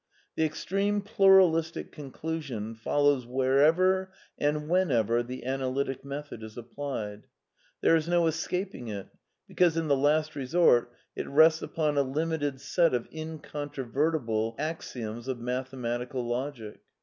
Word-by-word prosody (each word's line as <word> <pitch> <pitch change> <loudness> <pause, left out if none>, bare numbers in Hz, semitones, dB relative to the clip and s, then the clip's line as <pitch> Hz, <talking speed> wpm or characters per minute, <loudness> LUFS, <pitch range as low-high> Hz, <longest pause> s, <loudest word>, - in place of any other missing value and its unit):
The 160 - +1
extreme 195 +6 0
pluralistic 185 -5 +4
conclusion 140 -6 -5
follows 140 +2 +1
wherever 155 +9 +3 0.2
and 150 +1 -1
when 180 +1 +2
ever 115 -1 +2
the 125 +1 -7
analytic 135 0 -2
method 140 -3 -7
is 110 0 -10
applied. 115 -4 -6 0.5
There 165 - +5
is 160 0 0
no 175 -1 +3
escaping 165 -3 -2
it, 100 -3 -6 0.4
because, 175 -3 +2
in 165 -2 -1
the 140 - +5
last 155 +3 +1
resort, 130 -3 +3 0.2
it - - -4
rests 160 +3 +5
upon 150 -3 0
a - - +6
limited 145 0 -1
set 165 +1 +2
of 120 - -3
incontrovertible 145 -6 -2
axioms 120 -7 -5
of 130 -2 -2
mathematical 125 0 -3
logic. 120 -3 -4
145 Hz, 125 wpm, -28 LUFS, 125-160 Hz, 0.5 s, a